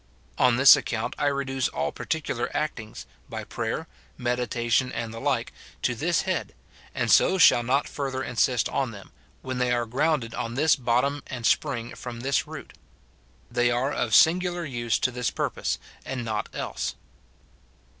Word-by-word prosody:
On 125 -2 +5
this 135 +2 +9
account 110 -2 -3
I 145 - +2
reduce 135 -2 0
all 75 +2 -2
particular 145 -6 -3
actings, 115 -8 -4 0.2
by - - -5
prayer, - - -3 0.3
meditation, 120 0 0
and 115 -2 -4
the 115 - -7
like, 130 -3 -1 0.3
to 125 - +2
this 165 +8 0
head; 190 -1 -2 0.4
and - - 0
so 190 - +5
shall 165 - +7
not 130 +4 +1
further 135 -2 -3
insist 125 -1 +1
on 135 -3 -1
them, 105 -4 -11 0.3
when 130 -1 -3
they 125 -1 +1
are 120 -1 +1
grounded 125 -1 0
on 115 +1 -4
this 150 +2 +4
bottom 130 +3 +1
and 125 -3 -5
spring 120 -5 +1
from 120 -2 -7
this 140 +2 0
root. - - -9 0.8
They 120 0 +2
are 125 +4 0
of 115 -6 +1
singular 175 +1 +4
use 120 -5 -1
to 130 -1 0
this 125 -1 -1
purpose, - - -2 0.3
and 125 -3 -4
not 110 -2 -2
else. - - -4
125 Hz, 160 wpm, -26 LUFS, 120-140 Hz, 0.8 s, this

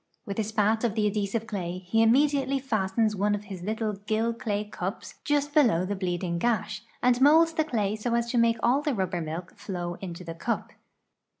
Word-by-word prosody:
With 200 +1 -4
a - - +2
spat 215 +1 +1
of 225 -3 0
the 215 -2 +1
adhesive 210 +2 -1
clay 185 -5 -4
he 190 +5 0
immediately 275 +3 +3
fastens 215 -4 0
one 205 +1 +1
of 205 - -6
his 195 -3 -8
little 215 +2 -2
gill 215 +3 -1
clay 210 -3 -2
cups 200 -1 -5
just 290 0 0
below 230 - +4
the 200 +2 -2
bleeding 175 -2 -2
gash, 215 -1 0 0.2
and 250 0 +3
molds 325 +4 +6
the 315 - +2
clay 215 -8 -1
so 235 +2 -1
as 235 0 0
to 245 - +2
make 230 0 +3
all 255 +4 +3
the 295 -3 -1
rubber 185 -3 -1
milk 165 +3 -6
flow 180 -3 -4
into 180 -2 -6
the 165 -1 -6
cup. 230 +8 -3
215 Hz, 200 wpm, -27 LUFS, 190-235 Hz, 0.2 s, molds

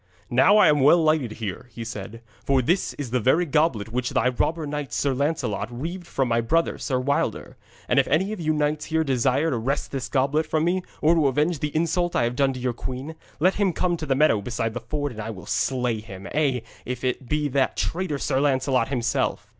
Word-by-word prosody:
'Now 185 - +5
am 150 - +5
I - - +1
well 145 +6 +7
lighted 155 -8 +1
here,' 110 +2 -6
he 115 +1 -7
said, 115 +1 -7 0.2
'for 135 -2 +2
this 175 +9 0
is 135 -5 -6
the 125 - +2
very 140 +9 +3
goblet 145 -9 +1
which 125 0 -1
thy 125 - +2
robber 155 +6 -1
knight 145 -1 -4
Sir 140 -2 0
Lancelot 125 -7 -1
reaved 170 +9 -6
from 135 -2 0
my 115 0 +2
brother, 165 +8 0
Sir 130 -3 -1
Wilder. 140 +3 -1 0.3
And - - +3
if - - +2
any 185 +8 +1
of 215 - -6
you 155 -1 +1
knights 150 0 0
here 160 0 +1
desire 135 +3 +1
to 125 - 0
wrest 135 +6 -2
this 130 -3 -4
goblet 140 +4 +1
from 155 0 0
me, 180 +2 +1 0.2
or 160 +2 +5
to 160 -4 +3
avenge 150 +4 +1
the 150 +1 -3
insult 170 +2 0
I - - +3
have 120 +1 -1
done 135 0 +1
your 125 -1 -2
queen, 130 +6 -6 0.3
let 185 +5 +4
him 200 -3 +1
come 175 +1 0
to 155 - -6
the 135 - +2
meadow 135 -7 +3
beside 115 +1 -2
the 120 - -3
ford, 145 +4 -3
and 110 -2 -7
I 110 - -5
will 95 -5 -8
slay 125 -4 0
him, 95 -2 -10
ay, 135 -5 +1 0.2
if 125 0 -5
it 125 0 -2
be 150 -1 +1
that 135 -1 0
traitor 170 -4 -1
Sir 135 -1 0
Lancelot 130 -2 +2
himself.' 125 -4 -1
135 Hz, 225 wpm, -24 LUFS, 125-155 Hz, 0.3 s, well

